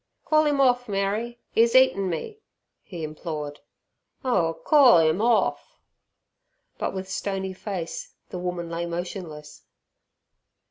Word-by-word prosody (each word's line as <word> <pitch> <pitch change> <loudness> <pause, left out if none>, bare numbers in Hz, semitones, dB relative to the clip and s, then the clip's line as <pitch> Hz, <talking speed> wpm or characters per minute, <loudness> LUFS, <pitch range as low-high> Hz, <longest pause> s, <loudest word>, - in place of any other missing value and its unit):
"Call 310 -1 +3
'im 290 -1 +1
orf, 245 -3 +3
Mary, 205 +4 -1 0.2
'e's 230 +1 +4
eatin' 260 -8 +4
me," 420 - -5 0.4
he 175 -4 -8
implored. 155 -1 -5 0.7
"Oh 170 -10 +1
corl 275 - +7
'im 160 +6 +1
orf." 235 0 +1 1.0
But - - -2
with 190 0 -5
stony 190 0 -3
face 185 -3 -6
the 180 - -6
woman 180 -1 -3
lay 170 +1 -3
motionless. 170 -4 -6
190 Hz, 120 wpm, -25 LUFS, 170-235 Hz, 1.0 s, corl